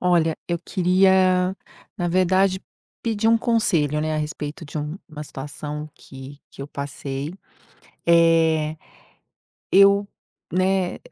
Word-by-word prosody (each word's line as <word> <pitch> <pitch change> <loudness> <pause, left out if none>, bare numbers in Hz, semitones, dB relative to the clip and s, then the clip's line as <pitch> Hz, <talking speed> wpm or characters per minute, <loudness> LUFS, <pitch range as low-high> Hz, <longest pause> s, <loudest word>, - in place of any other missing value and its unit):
Olha, 170 -3 +2
eu 170 -1 0
queria, 185 0 +3 0.4
na 175 - -1
verdade, 185 +1 +2 0.4
pedir 225 -1 0
um 230 0 +5
conselho, 170 - +1
né, 155 0 -1
a - - -1
respeito 150 +1 -5
de 145 - -9
um 150 +4 -5
uma 155 -2 -8
situação 150 +2 -7
que 135 +1 -12
que - - -13
eu - - -6
passei. 140 +1 -5 0.7
Eh, 165 -2 +3 1.0
eu, 200 +1 +6 0.4
né, 185 0 +1
170 Hz, 120 wpm, -23 LUFS, 150-185 Hz, 1.0 s, eu